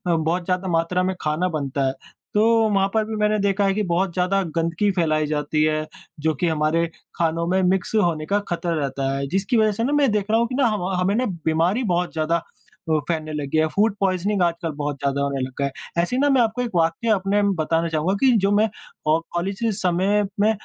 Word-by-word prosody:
बहुत 165 +2 -1
ज़्यादा 185 +1 -1
मात्रा 175 +1 +1
में 185 0 -1
खाना 155 +4 0
बनता 140 -3 -2
है 130 - -1 0.4
तो 210 - +4 0.3
वहाँ 195 -1 +2
पर 220 - +2
भी 220 0 -5
मैंने 210 0 +1
देखा 200 0 +1
है 195 - +2
कि 210 +2 -1
बहुत 175 +1 0
ज़्यादा 185 +2 +1
गंदगी 165 +5 +1
फैलाई 155 -4 +1
जाती 150 0 -1
है 155 0 +1 0.4
जो 160 +1 +1
कि 175 +6 0
हमारे 160 +1 +1 0.3
खानों 165 0 0
में 190 +2 +2
मिक्स 185 +3 0
होने 170 -7 +1
का 200 +5 +1
ख़तरा 175 0 -1
रहता 135 -1 -3
है। 140 0 -3
जिसकी 195 - 0
वज़ह 215 -1 +4
से 220 +3 -2
न 265 - 0
मैं 280 -5 +3
देख 210 -2 0
रहा 225 - +4
हूँ 235 - +2
कि 250 - -5
ना 270 -1 +3
ह 215 - 0
म 185 0 -3
हमें 195 +3 +1
न 250 +3 +1 0.2
बीमारी 170 +9 +1
बहुत 175 0 0
ज़्यादा 160 +1 0
अ, 160 -2 -5
फैलने 155 -2 -2
लगी 145 0 -2
है। 160 0 +3
फूड 210 +1 +2
पॉइज़निंग 195 +1 0
आजकल 170 -1 -1
बहुत 145 0 -2
ज़्यादा 140 0 -1
होने 140 -1 -1
लग 130 +1 -3
गया 140 - +1
है। 140 +5 -4
ऐसे 175 - -2
ही 260 - +1
न 285 - +3
मैं 260 - +4
आपको 225 +1 0
एक 240 -2 -3
वाक्य 165 +7 +1
अपने 200 0 +2 0.2
बताना 165 +2 0
चाहूँगा 160 +3 0
कि 260 - +6
जो 195 0 +1
मैं 215 +2 +3 0.4
औ 155 +1 +4
कॉलेज 190 +3 -2
के 225 - +2
समय 195 +1 +1 0.2
में 210 +2 +4
180 Hz, 230 wpm, -22 LUFS, 160-205 Hz, 0.4 s, कि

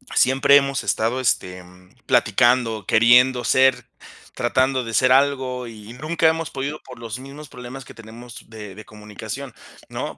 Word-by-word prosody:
Siempre 135 +2 +4
hemos 135 -1 -1
estado, 115 +4 -1
este, 90 -7 -2 0.4
platicando, 115 -1 +2
queriendo 125 +4 +4
ser, 130 -1 +3 0.5
tratando 130 +2 0
de 115 -1 -7
ser 130 +2 +3
algo, 130 -2 0
y 110 0 -11
nunca 155 +5 0
hemos 165 0 0
podido 140 +3 -5
por 125 -2 -13
los 115 +1 -7
mismos 140 +3 -11
problemas 125 +1 -10
que - - -13
tenemos 115 +1 -13
de 105 -4 -10
de 105 - -11
comunicación, 110 +5 -9 0.4
¿no? - - -6
125 Hz, 145 wpm, -21 LUFS, 115-135 Hz, 0.5 s, Siempre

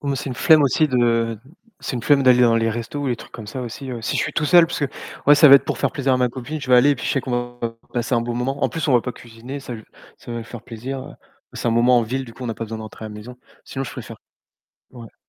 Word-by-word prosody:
Pour 145 - -5
moi 135 - 0
c'est 140 - -5
une - - -4
flemme 155 +3 +5
aussi 150 +3 +2
de 115 -3 +1 0.4
c'est 130 - -3
une 120 - -5
flemme 145 -2 +4
d'aller 125 -1 +5
dans 115 -1 +5
les 115 0 +1
restos 120 +5 -5
ou 145 - -2
les 120 -2 0
trucs - - -13
comme 110 -3 -9
ça 125 +4 -5
aussi, 125 +3 -7
ouais. 115 -2 -6
Si - - -1
je - - +1
suis - - -3
tout 150 - 0
seul 170 +1 +6
parce 170 - -4
que 140 - +2 0.4
ouais, 145 - +8
ça 150 0 +7
va 140 - +10
être 140 - +6
pour - - -3
faire - - +1
plaisir 135 -2 0
à 130 - +4
ma 125 -1 +2
copine. 135 +5 -6
Je 135 - -8
vais 125 - +7
aller 130 +4 +6
et - - +3
puis 125 - -6
je - - 0
sais 135 - +1
qu'on 120 -1 -3
va 115 -1 -3 0.2
passer 120 +1 -1
un 115 - +2
bon 120 0 -3
moment. 135 +4 -2
En - - +3
plus, 165 - -3
on - - +3
va 120 - +5
pas 125 - -5
cuisiner. 120 +4 -9
Ça 125 - -8
lui 110 - -10 0.3
ça - - -12
va 115 - -4
lui 115 - -7
faire 120 0 -9
plaisir. 130 +5 -7 0.4
C'est - - -2
un - - +2
moment 120 +2 +4
en - - +2
ville, 130 +4 -3
du 115 -2 -13
coup, 130 - -8
on - - -3
n'a 115 - -3
pas 115 - -5
besoin 110 0 -6
de - - -7
rentrer 110 0 -9
à - - -7
la 105 - -10
maison. 115 +4 -10 0.3
Sinon, 135 - -5
je - - -7
préfère - - -9 0.7
ouais. 115 -3 -12
125 Hz, 330 wpm, -21 LUFS, 115-135 Hz, 0.7 s, va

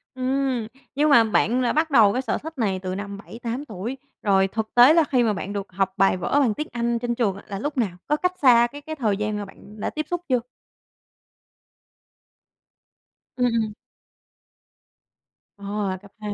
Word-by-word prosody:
Ừm. 260 -3 -1 0.3
Nhưng 300 +2 +3
mà 240 -5 +7
bạn 225 +3 +1
là 245 - +1
bắt 315 +1 +1
đầu 215 -6 +6
cái 255 - 0
sở 240 - -1
thích 320 -1 -9
này 195 -5 0
từ 185 0 -4
năm 200 0 -6
7-8 235 +6 -6
tuổi, 225 +2 -5 0.2
rồi 195 -2 +3
thực 220 +2 -4
tế 245 +5 +8
là 330 -1 +5
khi 255 -4 +1
mà 220 -2 +2
bạn 200 +1 -5
được 200 -2 -5
học 190 +1 -1
bài 195 -1 +3
vở 285 - +1
bằng 245 -7 +3
tiếng 300 +6 -4
Anh 235 0 -1
trên 240 0 -2
trường 210 -6 0
á 200 - -11
là 195 -1 -5
lúc 290 +5 -4
nào? 200 -8 -1
Có 300 - +2
cách 360 +2 0
xa 240 -3 +6
cái 290 +4 -11
cái 315 +1 -6
thời 215 -8 0
gian 210 0 -2
mà 205 - -4
bạn 210 +2 -15
đã - - -2
tiếp 310 0 -4
xúc 350 -1 -2
chưa? 250 -1 +3 3.0
Ừm, 250 - +2
ừm. 220 -2 -1 1.8
Ờ, 200 -1 -3
cấp 200 - -16
2. 210 -1 -4
230 Hz, 195 wpm, -23 LUFS, 200-265 Hz, 3.0 s, tế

